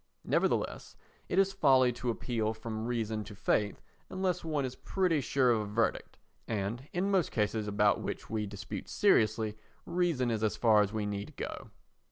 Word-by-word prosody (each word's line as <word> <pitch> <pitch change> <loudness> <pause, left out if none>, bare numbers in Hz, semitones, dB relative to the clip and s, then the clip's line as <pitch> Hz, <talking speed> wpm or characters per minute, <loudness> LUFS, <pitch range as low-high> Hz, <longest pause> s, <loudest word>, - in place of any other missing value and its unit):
Nevertheless - - 0 0.3
it 180 - -1
is 195 0 +4
folly 135 -9 +5
to 125 +1 -3
appeal 115 -2 -1
from 110 0 -5
reason 110 -3 -1
to 105 +1 -10
faith 100 +1 0 0.3
unless 185 -2 -1
one 155 -4 -1
is 125 - -4
pretty 180 -6 0
sure 130 -1 +2
of 110 -2 +2
a - - -3
verdict 105 +3 -1 0.3
and, 110 +5 -3
in 190 +3 0
most 190 -5 +2
cases 105 -1 0
about 105 0 +2
which - - -5
we 110 -2 -2
dispute 100 +1 -7
seriously, 110 - +2 0.3
reason 170 -8 +1
is 110 -1 -1
as 110 - 0
far 110 -3 +5
as 105 -1 0
we 110 -1 -2
need 100 0 -4
go. - - -6
115 Hz, 175 wpm, -31 LUFS, 105-145 Hz, 0.3 s, folly